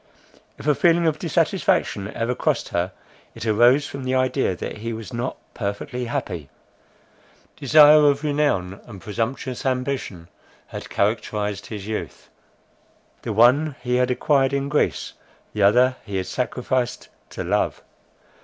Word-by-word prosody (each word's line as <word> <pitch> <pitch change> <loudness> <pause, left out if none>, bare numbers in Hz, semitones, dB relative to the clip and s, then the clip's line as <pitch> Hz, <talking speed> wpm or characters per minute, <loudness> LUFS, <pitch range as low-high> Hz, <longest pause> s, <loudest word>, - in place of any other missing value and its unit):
If - - -11
a 150 - +4
feeling 170 +3 +3
of 155 -2 +1
dissatisfaction 170 - 0
ever 115 +2 -1
crossed - - -1
her, 85 +2 -1 0.4
it - - -7
arose 120 +6 +4
from 140 -1 -7
the 130 0 -1
idea 130 -6 +1
that - - -6
he 115 +2 -4
was 110 +2 -8
not 120 +2 -3 0.2
perfectly 120 +5 -4
happy. 100 - -4 1.1
Desire 150 +1 +7
of 140 +1 -1
renown, 140 -11 0
and 105 -5 -11
presumptuous 120 +5 -4
ambition, 125 -9 -2 0.4
had - - -8
characterized 105 -1 -1
his 105 -3 -7
youth. 110 0 -6 0.9
The 115 - -4
one 130 +7 +4
he 125 -1 +1
had 125 0 +2
acquired 135 +1 +2
in 140 0 -1
Greece; 150 - 0 0.4
the 105 - -2
other 125 +6 +4
he 100 -3 -7
had 95 - -2
sacrificed 125 +1 -2 0.2
to - - -5
love. - - -1
125 Hz, 140 wpm, -23 LUFS, 105-140 Hz, 1.1 s, Desire